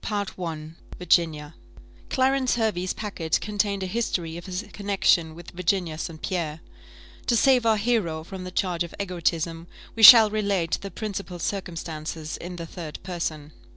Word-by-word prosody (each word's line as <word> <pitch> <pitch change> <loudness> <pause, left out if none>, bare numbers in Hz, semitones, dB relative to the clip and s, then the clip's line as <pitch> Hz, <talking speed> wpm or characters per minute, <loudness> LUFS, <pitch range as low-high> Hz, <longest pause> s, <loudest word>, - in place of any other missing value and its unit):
CHAPTER 205 -2 -2
XXVI. 160 -3 -6 0.2
VIRGINIA 160 -3 +1 0.6
Clarence 260 -1 +2
Hervey's 210 -6 0
packet 185 -7 -2
contained 205 -2 -1
a - - -1
history 180 -5 -2
of 170 +2 -8
his 185 +1 -4
connexion 195 -5 +1
with 170 0 -11
Virginia 175 -2 -1
St. 165 -1 -5
Pierre. 165 -4 -3 0.7
To 240 - +3
save 250 -1 +4
our 220 -1 +4
hero 200 -8 0
from 190 +2 -8
the 185 - -6
charge 180 -2 -1
of 170 - -9
egotism, 170 -3 -2 0.3
we 225 - -3
shall 220 -1 +11
relate 200 -5 0
the 195 - -6
principal 200 -4 -5
circumstances 165 -4 -4
in 175 +1 -7
the 170 -1 -6
third 165 -2 -7
person. 160 -5 -4
180 Hz, 155 wpm, -25 LUFS, 165-205 Hz, 0.7 s, shall